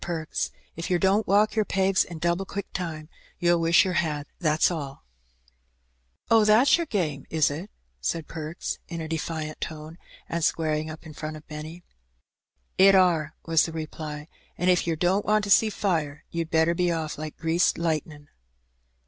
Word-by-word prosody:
Perks, 165 -2 -2 0.3
if 165 - -5
yer 180 - +3
don't 195 +4 +2
walk 210 +3 +3
yer 215 - +3
pegs 195 -1 +2
in 170 - -9
double 170 +3 0
quick 200 +1 -5
time, 160 -4 -4 0.3
you'll 175 0 +3
wish 165 +3 +5
yer 185 - -1
had, 150 -4 -1
that's 155 0 +2
alL" 140 -5 -6 1.3
"Oh, 225 -1 +6
that's 215 +6 +6
yer 340 -1 -2
game, 155 - -2
is 155 -2 +2
it?" 165 +8 -6 0.3
said 165 - -2
Perks, 160 +1 -5
in 170 -2 -5
a 160 - -4
defiant 155 -1 -4
tone, 160 +2 -7 0.3
and 170 0 -2
squaring 155 -1 0
up 155 +2 -9
in 155 - -9
front 155 +1 -6
of 155 - -16
Benny. 155 +3 -8 0.5
" 60 -1 -48
It 195 - +6
are," 165 -4 +3
was 165 -1 +3
the 165 - -7
reply; 155 -1 -6 0.2
" - - -35
an* 180 +2 +1
if 180 -1 +3
yer 165 - +1
don't 180 +5 +1
want 215 0 +3
to 200 - -2
see 220 +2 +6
fire, 160 -9 -2
you'd 165 -1 -3
better 160 +1 +3
be 175 0 +1
off 160 -3 -3
like 155 0 -6
greased 165 +2 +1
lightnin'." 155 -3 -2
165 Hz, 180 wpm, -26 LUFS, 155-180 Hz, 1.3 s, Oh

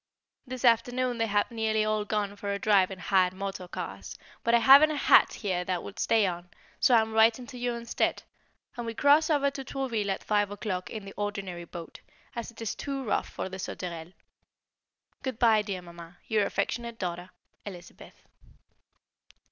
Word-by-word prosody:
This 255 0 -4
afternoon 245 +1 +2
they 225 - +1
have 205 +1 +1
nearly 220 -1 0
all 215 -1 0
gone 205 -1 -2
for 200 0 -4
a 200 - -1
drive 200 -2 +3
in 190 - -7
hired 185 +1 +2
motor 195 -1 -5
cars, - - -7 0.3
but 235 0 +3
I - - +7
haven't 275 +6 +8
a 305 - -2
hat - - +5
here 185 -5 -2
that 180 -2 -2
would 205 +3 -9
stay 225 -2 +3
on, 175 -1 -4 0.3
so 250 - +5
I 225 - +6
am 220 0 -4
writing 225 +2 +4
to 250 +1 -10
you 245 0 -1
instead, 235 0 -1 0.5
and 240 -2 -5
we 230 - -4
cross 290 +5 +4
over 280 -2 +2
to 270 0 -6
Trouville 245 -7 -2
at 195 - -2
five 205 -1 +1
o'clock 195 -3 -4
in 215 -3 -7
the 195 - -9
ordinary 195 -4 -4
boat, 170 -1 -10 0.3
as 235 0 -4
it 235 - -15
is 225 - -2
too 275 -1 -4
rough 220 - -1
for - - -5
the 190 0 -8
Sauterelle. 170 -2 -6 1.1
Good 260 -4 -4
bye, 225 -3 +4
dear 195 -3 -5
Mamma, 170 0 -12
your 210 -2 +1
affectionate 235 +3 -3
daughter, 175 -1 -4 0.3
Elizabeth. 180 -4 -12
210 Hz, 185 wpm, -28 LUFS, 190-235 Hz, 1.1 s, haven't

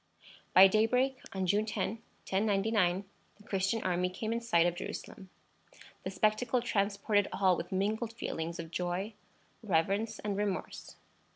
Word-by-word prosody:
By 190 - +11
daybreak 250 +6 +2
on 190 -1 -2
June 205 +4 +2
10, 225 +1 -2 0.3
1099, 195 -2 +1 0.3
the 210 - -18
Christian 200 +1 -1
army 180 0 +1
came 220 +5 -3
in 235 - -2
sight 195 -8 +3
of 175 - +2
Jerusalem. 190 +1 -7 0.7
The - - -4
spectacle 215 +6 +1
transported 205 -2 +1
all 190 -2 +3
with 170 - -6
mingled 215 +4 -1
feelings 170 -6 -4
of 165 -2 -7
joy, 180 +5 -2 0.5
reverence, 200 +3 0
and 205 -1 -3
remorse. 200 -2 -3
200 Hz, 135 wpm, -32 LUFS, 185-220 Hz, 0.7 s, By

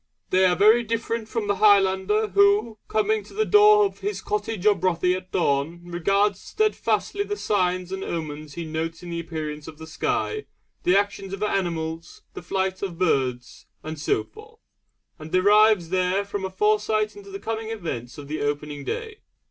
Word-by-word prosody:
They 185 +1 +4
are 180 -1 +4
very 215 +5 +5
different 230 0 -3
from 225 -2 -2
the 205 -1 0
Highlander 200 +1 +3
who, 205 +3 +3
coming 215 0 +1
to - - -15
the 435 +1 +1
door 420 0 +6
of 395 - -4
his 415 +1 -3
cottage 225 - -3
or 210 - +7
bothie 180 -1 +1
at 185 0 -8
dawn, 155 0 0
regards 195 +3 +1
steadfastly 425 -1 0
the 415 0 -4
signs 185 - 0
and 190 0 -4
omens 155 -3 -5
he 170 - -5
notes 160 +2 -4
in 175 - -7
the 170 - -3
appearance 155 -2 -5
of 160 -1 -10
the 160 - -9
sky, 425 - -2 0.4
the 180 +2 +5
actions 200 -1 -2
of 195 +1 -4
animals, 165 -5 -3
the - - -7
flight 190 +2 -2
of 185 -4 -4
birds, 130 -8 -1 0.2
and 155 -1 -6
so 405 - 0
forth, 440 +1 -16 0.6
and 155 +1 -9
derives 205 -1 +4
there 185 +2 +1
from 200 -1 -4
a - - -3
foresight 215 +2 +1
into 405 -1 -12
the 395 - -6
coming 225 - -4
events 145 - -5
of 145 -1 -9
the 155 +2 -4
opening 145 0 -3
day. 445 - -5
190 Hz, 180 wpm, -24 LUFS, 165-215 Hz, 0.6 s, or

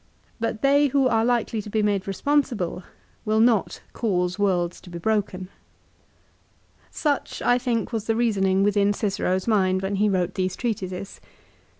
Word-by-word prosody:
But 225 -1 -3
they 285 +1 +4
who 275 -1 +2
are 225 -2 +2
likely 235 -2 0
to 210 - -10
be 215 0 0
made 200 -2 0
responsible 235 -5 0 0.4
will 215 0 +1
not 225 -3 +2
cause 180 -4 -1
worlds 180 -4 0
to 180 - -13
be 175 - -7
broken. 190 -1 -1 1.4
Such, 290 -2 -2
I 245 0 +3
think, 240 -2 -2
was 220 -2 -2
the 225 - 0
reasoning 195 -5 +2
within 205 0 +2
Cicero's 195 -2 -1
mind 190 -4 +2
when 195 +1 -1
he 210 +1 +2
wrote 185 -1 0
these 185 -1 -2
treatises. 195 -5 -4
205 Hz, 155 wpm, -24 LUFS, 190-230 Hz, 1.4 s, they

